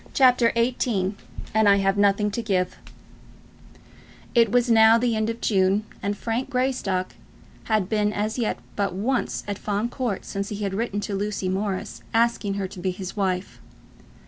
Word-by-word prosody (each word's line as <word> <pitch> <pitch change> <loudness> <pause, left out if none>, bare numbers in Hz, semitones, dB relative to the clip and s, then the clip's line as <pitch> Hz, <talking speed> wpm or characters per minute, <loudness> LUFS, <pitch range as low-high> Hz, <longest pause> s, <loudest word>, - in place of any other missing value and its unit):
CHAPTER 250 -3 +5
XVIII 230 -5 +1 0.4
"And 220 -1 +4
I 200 - +7
Have 195 0 +2
Nothing 205 +1 +2
to 235 - -2
Give" 185 -5 -1 1.5
It 230 -1 +4
was 245 0 +3
now 225 -1 +6
the 235 -1 +1
end 220 0 0
of 230 0 -5
June, 195 0 +2 0.2
and 205 0 -2
Frank 235 +3 -2
Greystock 250 -8 -1 0.5
had 215 -4 +1
been 210 0 +1
as 215 +3 -2
yet 225 - 0 0.2
but 200 -3 -1
once 240 +6 -1
at 205 -1 -4
Fawn 210 +3 -1
Court 240 -6 -3
since 200 0 -4
he 210 0 -4
had 195 -1 -2
written 205 -1 -2
to 205 - -4
Lucy 200 -1 -2
Morris 190 0 -3
asking 230 -3 +2
her 195 -1 -2
to 185 - -11
be 185 +1 -1
his 185 0 -6
wife. 190 -2 -2
210 Hz, 170 wpm, -24 LUFS, 195-230 Hz, 1.5 s, I